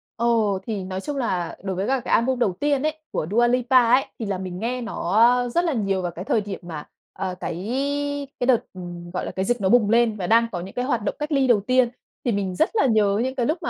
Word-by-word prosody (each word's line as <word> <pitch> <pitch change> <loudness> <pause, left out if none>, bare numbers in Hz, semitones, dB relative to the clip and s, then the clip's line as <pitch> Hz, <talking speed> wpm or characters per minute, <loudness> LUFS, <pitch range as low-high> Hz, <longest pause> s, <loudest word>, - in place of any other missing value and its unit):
Ồ, 225 -5 +1
thì 210 -4 -3
nói 185 0 -5
chung 285 +6 -4
là 185 -9 -2
đối 190 -1 -3
với 190 +3 -2
cả 265 0 +1
cái - - -3
album 255 +2 +2
đầu 195 -6 +2
tiên 285 -2 +1
ấy, 310 0 -1
của 155 - -2
Dua 240 +2 +4
Lipa 250 +1 +4
ấy, 265 +2 +4
thì 225 - -3
là 200 -2 -2
mình 185 -1 -6
nghe 245 +3 -2
nó, 225 -6 -4 0.3
a, - - -4
rất 345 +8 +1
là 325 - +1
nhiều 195 -5 0
vào 175 -1 -3
cái 180 +3 -8
thời 235 -6 +1
điểm 200 -1 -6
mà, 160 -4 -6 0.3
ờ, 185 -1 -4
cái 180 +5 -4 0.7
cái 245 - 0
đợt, 255 - +6 0.2
ừ, 185 - -9 0.3
gọi 180 - -2
là, - - -4
cái 190 - -2
dịch 240 0 0
nó 190 - +2
bùng 225 -3 +4
lên 230 -1 +3
và 180 -3 -3
đang 230 +1 +4
có 175 - -3
những 190 - -9
cái 250 0 -1
hoạt 245 -5 0
động - - -2
cách 300 +1 -3
ly 275 -3 +3
đầu 235 -4 +5
tiên. 255 +2 +3 0.4
Thì 240 - +2
mình 195 -3 -2
rất 320 - +2
là 420 - +3
nhớ 210 -3 +3
những 260 +1 -2
cái 245 - 0
lúc 310 +8 0
mà - - -1
225 Hz, 275 wpm, -23 LUFS, 190-255 Hz, 0.7 s, đợt